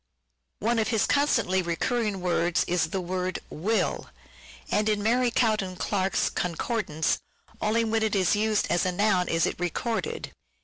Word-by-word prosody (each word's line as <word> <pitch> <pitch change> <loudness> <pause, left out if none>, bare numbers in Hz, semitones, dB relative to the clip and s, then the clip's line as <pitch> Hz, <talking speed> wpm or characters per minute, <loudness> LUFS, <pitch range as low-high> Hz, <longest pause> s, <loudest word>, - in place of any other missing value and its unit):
One 230 +2 +1
of 220 - +1
his 225 -3 +2
constantly 230 -10 +2
recurring 200 +4 -1
words 175 -1 +1
is 175 -2 0
the 190 - -3
word 185 +1 -2
" - - -29
will," 215 +9 -1 0.6
and 210 +1 +2
in 210 -1 0
Mary 245 +3 +3
Cowden 215 -6 +1
Clarke's 190 0 0
concordance 180 -2 -1 0.4
only 225 +2 +2
when 225 0 0
it 220 -1 +1
is 190 +1 +3
used 215 0 +1
as 175 - +2
a 185 - +1
noun 185 -1 +2
is 165 0 +2
it - - -3
recorded. 230 - -3
205 Hz, 160 wpm, -27 LUFS, 180-225 Hz, 0.6 s, Mary